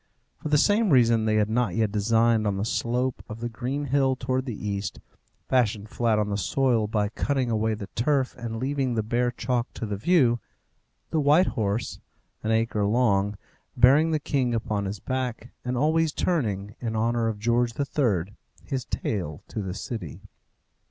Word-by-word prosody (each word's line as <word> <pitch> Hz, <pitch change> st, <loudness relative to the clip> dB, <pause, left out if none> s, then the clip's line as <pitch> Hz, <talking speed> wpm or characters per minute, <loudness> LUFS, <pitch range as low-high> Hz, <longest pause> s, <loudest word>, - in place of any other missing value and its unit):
For 155 Hz, -, -5 dB
the 150 Hz, -, +4 dB
same 205 Hz, +7 st, +3 dB
reason 115 Hz, -5 st, +4 dB
they 110 Hz, -1 st, +2 dB
had 105 Hz, -1 st, +3 dB
not 110 Hz, -4 st, 0 dB
yet 110 Hz, -2 st, +1 dB
designed 110 Hz, +1 st, +2 dB
on 100 Hz, -1 st, 0 dB
the 100 Hz, -, -1 dB
slope 125 Hz, +2 st, -1 dB
of 110 Hz, +1 st, -7 dB
the 120 Hz, +1 st, -3 dB
green 130 Hz, +5 st, -3 dB
hill 135 Hz, -1 st, +2 dB
towards 130 Hz, +1 st, -2 dB
the 105 Hz, -3 st, -5 dB
east, 100 Hz, 0 st, -3 dB, 0.5 s
fashioned 110 Hz, -4 st, +1 dB
flat 115 Hz, -2 st, +1 dB
on 105 Hz, -1 st, 0 dB
the 100 Hz, -, -1 dB
soil 120 Hz, 0 st, +1 dB
by 105 Hz, -1 st, 0 dB
cutting 130 Hz, +1 st, -1 dB
away 110 Hz, 0 st, +1 dB
the 105 Hz, -, -6 dB
turf 135 Hz, +2 st, +1 dB
and 115 Hz, -2 st, -5 dB
leaving 130 Hz, 0 st, -1 dB
the 110 Hz, -, 0 dB
bare 120 Hz, +3 st, +1 dB
chalk 120 Hz, 0 st, -2 dB
to -, -, -4 dB
the 105 Hz, -2 st, -3 dB
view, 125 Hz, -, +3 dB, 0.7 s
the 160 Hz, -, +1 dB
white 150 Hz, +5 st, +5 dB
horse, 110 Hz, -, -2 dB, 0.4 s
an 110 Hz, -, -3 dB
acre 110 Hz, -1 st, +1 dB
long, 105 Hz, -2 st, +2 dB, 0.4 s
bearing 140 Hz, +6 st, +6 dB
the 160 Hz, -, +2 dB
king 130 Hz, -4 st, 0 dB
upon 105 Hz, -2 st, -2 dB
his 100 Hz, +1 st, -4 dB
back, 125 Hz, -2 st, -3 dB
and 125 Hz, 0 st, -2 dB
always 160 Hz, +3 st, +2 dB
turning, 105 Hz, -, -1 dB
in 115 Hz, -2 st, -3 dB
honour 115 Hz, +1 st, +1 dB
of 110 Hz, -2 st, -2 dB
George 120 Hz, +2 st, +1 dB
III., 110 Hz, -, 0 dB, 0.3 s
his 130 Hz, -4 st, -3 dB
tail 85 Hz, -9 st, -3 dB
to 110 Hz, -, -4 dB
the 95 Hz, -1 st, -4 dB
city. 95 Hz, -, -6 dB
115 Hz, 180 wpm, -26 LUFS, 105-130 Hz, 0.7 s, bearing